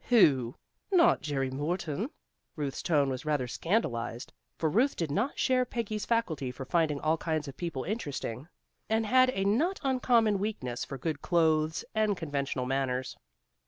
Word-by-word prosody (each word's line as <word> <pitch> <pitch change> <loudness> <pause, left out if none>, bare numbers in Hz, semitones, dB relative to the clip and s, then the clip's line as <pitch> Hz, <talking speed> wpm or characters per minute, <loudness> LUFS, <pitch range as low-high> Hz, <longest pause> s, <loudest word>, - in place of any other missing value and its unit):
"Who? 135 - +4 0.4
Not 350 -3 +5
Jerry 135 -2 -1
Morton?" 155 - -2 0.5
Ruth's 145 -3 -3
tone 145 -4 +2
was 130 0 -4
rather 150 -4 0
scandalized, 120 - -2 0.2
for 160 - +1
Ruth 235 - +2
did 165 -4 -2
not 220 - 0
share 255 -1 +3
Peggy's 220 -4 -3
faculty 170 - 0
for 130 +1 -7
finding 155 -1 +1
all 155 +2 +1
kinds 155 -2 -2
of 140 - -7
people 165 -7 -4
interesting, 145 - -4 0.4
and 220 0 +2
had 255 +3 +5
a 195 -6 -1
not 300 - +2
uncommon 240 -6 +3
weakness 130 - -3
for 135 - -6
good 145 +2 -3
clothes 160 -2 +2
and 215 -3 +1
conventional 140 -5 -2
manners. 130 -1 -1
160 Hz, 155 wpm, -30 LUFS, 135-220 Hz, 0.5 s, Not